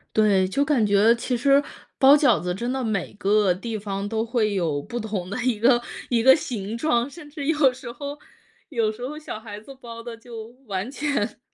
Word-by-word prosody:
对， 200 Hz, -3 st, +4 dB
就 275 Hz, +10 st, +1 dB
感 275 Hz, -7 st, +2 dB
觉 205 Hz, +3 st, +5 dB
其 245 Hz, +1 st, -2 dB
实 275 Hz, +3 st, +4 dB, 0.4 s
包 275 Hz, +2 st, +7 dB
饺 275 Hz, -7 st, +4 dB
子 180 Hz, 0 st, -2 dB
真 240 Hz, +6 st, -3 dB
的 265 Hz, -1 st, -2 dB
每 215 Hz, -5 st, -2 dB
个 205 Hz, -1 st, +2 dB
地 220 Hz, +5 st, -3 dB
方 200 Hz, 0 st, -4 dB
都 220 Hz, +1 st, -1 dB
会 225 Hz, -3 st, 0 dB
有 165 Hz, -6 st, 0 dB
不 240 Hz, +11 st, -5 dB
同 205 Hz, -5 st, -4 dB
的 220 Hz, +6 st, -4 dB
一 240 Hz, -4 st, 0 dB
个 240 Hz, +1 st, +4 dB, 0.3 s
一 235 Hz, -2 st, +2 dB
个 265 Hz, +2 st, +8 dB
形 225 Hz, -7 st, -4 dB
状， 240 Hz, -1 st, +1 dB
甚 300 Hz, 0 st, -12 dB
至 285 Hz, -3 st, -5 dB
有 300 Hz, -5 st, +4 dB
时 245 Hz, -2 st, -8 dB
候 285 Hz, +4 st, -7 dB, 0.5 s
有 230 Hz, -6 st, 0 dB
时 245 Hz, +3 st, -7 dB
候 300 Hz, +2 st, -7 dB
小 305 Hz, -8 st, -7 dB
孩 210 Hz, -2 st, -9 dB
子 270 Hz, +6 st, -12 dB
包 230 Hz, -1 st, -9 dB
的 235 Hz, -1 st, -7 dB
就 225 Hz, -1 st, -10 dB, 0.2 s
完 195 Hz, +3 st, -3 dB
全 280 Hz, -8 st, -2 dB
230 Hz, 225 characters per minute, -24 LUFS, 205-265 Hz, 0.5 s, 个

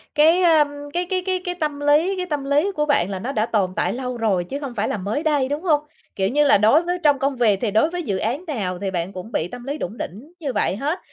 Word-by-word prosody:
cái, 320 Hz, +4 st, +5 dB
ờm, 315 Hz, -4 st, +5 dB, 0.3 s
cái 355 Hz, +1 st, 0 dB
cái 370 Hz, -1 st, 0 dB
cái 370 Hz, -1 st, 0 dB
cái 355 Hz, -, -2 dB
tâm 300 Hz, -4 st, -2 dB
lý 300 Hz, +6 st, +3 dB
cái 365 Hz, -, -2 dB
tâm 295 Hz, -5 st, -3 dB
lý 295 Hz, +8 st, +2 dB
của 300 Hz, 0 st, +1 dB
bạn 200 Hz, -, +2 dB
là 195 Hz, -2 st, -4 dB
nó 250 Hz, +8 st, -3 dB
đã 220 Hz, -4 st, 0 dB
tồn 195 Hz, -5 st, 0 dB
tại -, -, 0 dB
lâu 250 Hz, -1 st, -4 dB
rồi 205 Hz, -6 st, +1 dB
chứ 270 Hz, +11 st, -5 dB
không 275 Hz, -4 st, -6 dB
phải 205 Hz, -, 0 dB
là -, -, -2 dB
mới 205 Hz, -, -2 dB
đây, 290 Hz, -4 st, +1 dB
đúng 290 Hz, +2 st, -2 dB
hông? 300 Hz, -5 st, +3 dB, 0.3 s
Kiểu 190 Hz, 0 st, 0 dB
như 295 Hz, +4 st, +3 dB
là, -, -, +6 dB
đối 220 Hz, -, +4 dB
với 355 Hz, +1 st, -1 dB
trong 290 Hz, -2 st, +4 dB
công 275 Hz, 0 st, 0 dB
việc 215 Hz, -5 st, +2 dB
thì 220 Hz, -4 st, 0 dB
đối 220 Hz, +9 st, +3 dB
với 350 Hz, 0 st, -4 dB
dự 200 Hz, -7 st, -1 dB
án 250 Hz, -, -2 dB
nào 195 Hz, -, -3 dB
thì 195 Hz, -1 st, -3 dB
bạn 180 Hz, +1 st, -3 dB
cũng 185 Hz, +5 st, -8 dB
bị 160 Hz, -, -1 dB
tâm 240 Hz, +6 st, -9 dB
lý 280 Hz, +3 st, -4 dB
đủng 215 Hz, -4 st, -5 dB
đỉnh 230 Hz, -, -7 dB
như 280 Hz, -6 st, -3 dB
vậy -, -, 0 dB
hết. 295 Hz, -, -2 dB
275 Hz, 285 wpm, -22 LUFS, 210-310 Hz, 0.3 s, là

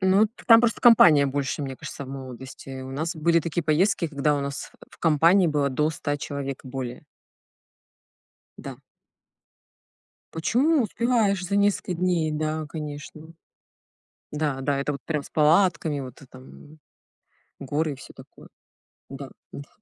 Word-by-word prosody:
Ну, 190 Hz, +3 st, +4 dB
т 230 Hz, -, -18 dB
там 230 Hz, -1 st, +8 dB
просто 240 Hz, -1 st, 0 dB
компания 170 Hz, -, +7 dB
больше, 140 Hz, +1 st, -2 dB
мне 135 Hz, -1 st, -5 dB
кажется, 140 Hz, -, -8 dB
в -, -, -11 dB
молодости. 130 Hz, 0 st, -9 dB
У 130 Hz, -, -8 dB
нас 160 Hz, +4 st, -3 dB
были 170 Hz, +2 st, +2 dB
такие 170 Hz, +1 st, -3 dB
поездки, 170 Hz, +3 st, +2 dB
когда 150 Hz, 0 st, 0 dB
у -, -, -2 dB
нас 140 Hz, -1 st, -5 dB, 0.2 s
в -, -, -17 dB
э, -, -, -47 dB
компании 170 Hz, +4 st, +4 dB
было 145 Hz, -2 st, +1 dB
до 150 Hz, +4 st, 0 dB
100 145 Hz, -1 st, -3 dB
человек 140 Hz, -2 st, -6 dB
и -, -, -9 dB
более. 125 Hz, -2 st, -6 dB, 1.5 s
Да. -, -, -8 dB, 1.5 s
Почему 255 Hz, -, +2 dB
успеваешь 215 Hz, -4 st, 0 dB
за 200 Hz, +2 st, -2 dB
несколько 200 Hz, -2 st, +1 dB
дней? 170 Hz, -3 st, 0 dB
Да, 155 Hz, 0 st, -2 dB
конечно. 155 Hz, +1 st, -8 dB, 1.0 s
Да, 150 Hz, -3 st, -2 dB
да, 140 Hz, +1 st, -1 dB
это 145 Hz, +1 st, -2 dB
вот 140 Hz, -, -7 dB
прям 150 Hz, -3 st, -2 dB
с -, -, -14 dB
палатками 160 Hz, -1 st, +2 dB
вот, 130 Hz, -1 st, -9 dB
э, -, -, -14 dB
там, 130 Hz, 0 st, -13 dB, 0.3 s
м, 155 Hz, -, -17 dB, 0.8 s
горы 145 Hz, +3 st, -2 dB
и -, -, -5 dB
всё 130 Hz, -, -13 dB
такое. -, -, -15 dB, 0.6 s
Да, 135 Hz, 0 st, -9 dB, 0.2 s
да. 140 Hz, -, -9 dB
150 Hz, 155 wpm, -25 LUFS, 140-175 Hz, 1.5 s, там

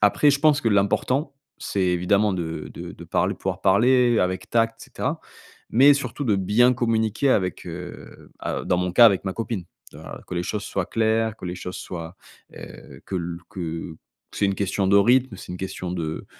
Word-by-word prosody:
après 125 Hz, +8 st, +5 dB
je 145 Hz, -, +1 dB
pense 150 Hz, -1 st, +4 dB
que 115 Hz, -, +1 dB
l'important, 125 Hz, +8 st, +1 dB, 0.2 s
c'est 100 Hz, -, -3 dB
évidemment 95 Hz, +3 st, +2 dB
de 80 Hz, -3 st, -5 dB
de -, -, -8 dB
de -, -, -11 dB
parl -, -, 0 dB
pouvoir -, -, -4 dB
parler 120 Hz, +4 st, +4 dB
avec 90 Hz, +1 st, -2 dB
tact 115 Hz, -1 st, +1 dB
et -, -, -8 dB
cetera. -, -, -3 dB, 0.5 s
Mais 140 Hz, +5 st, +6 dB
surtout 140 Hz, 0 st, -4 dB
de 105 Hz, -4 st, +2 dB
bien 105 Hz, +6 st, +3 dB
communiquer 115 Hz, +2 st, +1 dB
avec, 90 Hz, -5 st, 0 dB
heu, 90 Hz, +1 st, -9 dB
à -, -, -3 dB
dans 90 Hz, -, +1 dB
mon 90 Hz, 0 st, -1 dB
cas 120 Hz, +5 st, +8 dB
avec 100 Hz, -2 st, +2 dB
ma 95 Hz, -, -2 dB
copine, 110 Hz, -5 st, -4 dB, 0.3 s
heu, -, -, -11 dB
a -, -, -9 dB
que -, -, -6 dB
les 85 Hz, -, -1 dB
choses 105 Hz, +2 st, -3 dB
soient 95 Hz, -2 st, -2 dB
claires, 110 Hz, 0 st, 0 dB
que 95 Hz, -, -8 dB
les 90 Hz, -, -4 dB
choses 90 Hz, 0 st, -6 dB
soient 85 Hz, 0 st, -7 dB, 0.4 s
heu, -, -, -11 dB
que 95 Hz, -, -3 dB
l 85 Hz, -1 st, -4 dB
que 80 Hz, -2 st, -5 dB, 0.4 s
c'est 100 Hz, -, +1 dB
une 100 Hz, -, 0 dB
question 100 Hz, 0 st, -1 dB
de 100 Hz, -, +5 dB
rythme, 120 Hz, +2 st, +3 dB
c'est 90 Hz, -, -9 dB
une 90 Hz, -, -5 dB
question 95 Hz, -1 st, -5 dB
de 80 Hz, -3 st, -4 dB
100 Hz, 200 wpm, -23 LUFS, 90-115 Hz, 0.5 s, cas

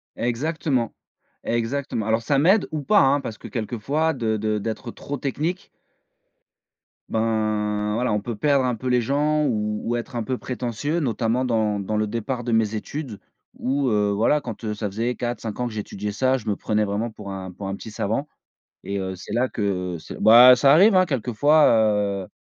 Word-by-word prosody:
Exactement, 130 Hz, 0 st, -1 dB, 0.5 s
exactement. 120 Hz, 0 st, -2 dB
Alors 110 Hz, +1 st, +2 dB
ça 140 Hz, +5 st, +1 dB
m'aide 190 Hz, +8 st, +4 dB
ou 155 Hz, -1 st, -3 dB
pas, 205 Hz, +9 st, +4 dB
hein, 135 Hz, +2 st, +4 dB
parce 110 Hz, -5 st, -6 dB
que -, -, -9 dB
quelquefois 125 Hz, +8 st, -1 dB
de 110 Hz, -4 st, -1 dB
de 105 Hz, 0 st, -1 dB
d'être 115 Hz, +3 st, -5 dB
trop 145 Hz, +4 st, -6 dB
technique 155 Hz, +8 st, -3 dB, 1.4 s
ben, 105 Hz, -2 st, 0 dB
voilà 125 Hz, 0 st, 0 dB
on 105 Hz, -, 0 dB
peut 115 Hz, +2 st, -5 dB
perdre 140 Hz, +4 st, +2 dB
un 125 Hz, -1 st, 0 dB
peu 130 Hz, +4 st, -6 dB
les 125 Hz, -1 st, +3 dB
gens 150 Hz, +5 st, +1 dB
ou 105 Hz, -4 st, 0 dB
ou 120 Hz, -, 0 dB
être 120 Hz, +2 st, -7 dB
un 120 Hz, -, -1 dB
peu 130 Hz, +3 st, -2 dB
prétentieux, 125 Hz, +6 st, -3 dB
notamment, 120 Hz, -3 st, 0 dB
dans 110 Hz, -4 st, 0 dB
dans 105 Hz, +2 st, -2 dB
le 105 Hz, 0 st, 0 dB
départ 115 Hz, +3 st, -3 dB
de 120 Hz, -, -1 dB
mes 110 Hz, -1 st, +1 dB
études 125 Hz, 0 st, -6 dB, 0.4 s
où, 135 Hz, 0 st, 0 dB
heu, 105 Hz, -2 st, +2 dB
voilà 115 Hz, +9 st, +2 dB
quand, 115 Hz, -3 st, -8 dB
heu, 105 Hz, -1 st, -2 dB
ça 105 Hz, 0 st, -3 dB
faisait 115 Hz, +5 st, -2 dB
4-5 120 Hz, -3 st, -4 dB
ans 125 Hz, -, 0 dB
que 115 Hz, -, -7 dB
j'étudiais 105 Hz, -1 st, -5 dB
ça, 130 Hz, +4 st, +2 dB
je 115 Hz, -3 st, -11 dB
me 105 Hz, -, +1 dB
prenais 105 Hz, +1 st, 0 dB
vraiment 105 Hz, +3 st, -2 dB
pour 100 Hz, -2 st, -9 dB
un 95 Hz, -1 st, -6 dB
pour 95 Hz, +2 st, -7 dB
un 95 Hz, -, -3 dB
petit 110 Hz, -, -9 dB
savant. 110 Hz, +7 st, -2 dB, 0.6 s
Et 100 Hz, +1 st, -3 dB
heu, 95 Hz, 0 st, -4 dB
c'est 95 Hz, -, -9 dB
là 125 Hz, +2 st, +1 dB
que, 90 Hz, -5 st, -2 dB, 0.2 s
heu -, -, -8 dB
bah, 120 Hz, +3 st, +9 dB
ça 135 Hz, +3 st, +5 dB
arrive 195 Hz, +8 st, +6 dB
hein, 185 Hz, -1 st, +5 dB
quelquefois, 145 Hz, +4 st, +3 dB
heu, 105 Hz, -4 st, +1 dB
115 Hz, 195 wpm, -23 LUFS, 105-135 Hz, 1.4 s, bah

